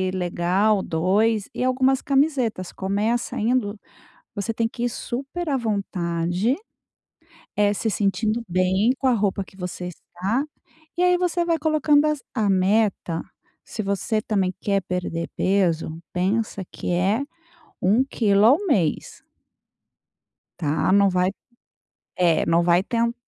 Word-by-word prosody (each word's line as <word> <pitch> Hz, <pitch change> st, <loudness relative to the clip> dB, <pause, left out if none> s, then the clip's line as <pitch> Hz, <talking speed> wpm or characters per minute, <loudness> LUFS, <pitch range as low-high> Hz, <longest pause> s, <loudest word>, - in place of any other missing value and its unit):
legal, 185 Hz, +3 st, +1 dB
2, 200 Hz, +6 st, +1 dB
e -, -, -2 dB
algumas 260 Hz, +1 st, +2 dB
camisetas. 270 Hz, -, 0 dB
Começa 210 Hz, +5 st, -1 dB
indo, 220 Hz, -2 st, 0 dB, 0.6 s
você 205 Hz, +3 st, -2 dB
tem 225 Hz, 0 st, 0 dB
que 235 Hz, +1 st, -5 dB
ir -, -, +2 dB
super 275 Hz, +9 st, -5 dB
à 280 Hz, -, +1 dB
vontade, 190 Hz, -2 st, -1 dB, 1.0 s
eh, 205 Hz, 0 st, +3 dB
se 220 Hz, +2 st, -1 dB
sentindo 210 Hz, +3 st, 0 dB
bem 185 Hz, +5 st, +2 dB
com 270 Hz, -, -1 dB
a 255 Hz, -, +5 dB
roupa 200 Hz, -3 st, 0 dB
que 190 Hz, -, -19 dB
você 180 Hz, -1 st, -5 dB
está, 190 Hz, -, -3 dB, 0.5 s
e -, -, +2 dB
aí 360 Hz, 0 st, +4 dB
você 350 Hz, -1 st, 0 dB
vai 335 Hz, -1 st, +1 dB
colocando 305 Hz, -1 st, +3 dB
as 300 Hz, -3 st, -1 dB
a 220 Hz, -5 st, +1 dB
meta, 190 Hz, -3 st, +1 dB, 0.4 s
se -, -, -7 dB
você 200 Hz, +2 st, -1 dB
também 195 Hz, -4 st, 0 dB
quer 200 Hz, -1 st, 0 dB
perder 175 Hz, -2 st, -3 dB
peso 170 Hz, -4 st, +1 dB
pensa 195 Hz, +2 st, -1 dB
que -, -, -5 dB
é 195 Hz, +8 st, +1 dB, 0.6 s
1 205 Hz, +7 st, +4 dB
quilo 210 Hz, -6 st, +2 dB
ao 260 Hz, +6 st, +7 dB
mês. 200 Hz, -, 0 dB, 1.4 s
Tá. 155 Hz, +3 st, +1 dB
Não 200 Hz, 0 st, +5 dB
vai 185 Hz, 0 st, +1 dB, 0.9 s
é 170 Hz, -3 st, +3 dB
não, 165 Hz, +1 st, +3 dB
vai 175 Hz, +1 st, +3 dB
ten 235 Hz, +2 st, 0 dB
205 Hz, 135 wpm, -23 LUFS, 185-240 Hz, 1.4 s, ao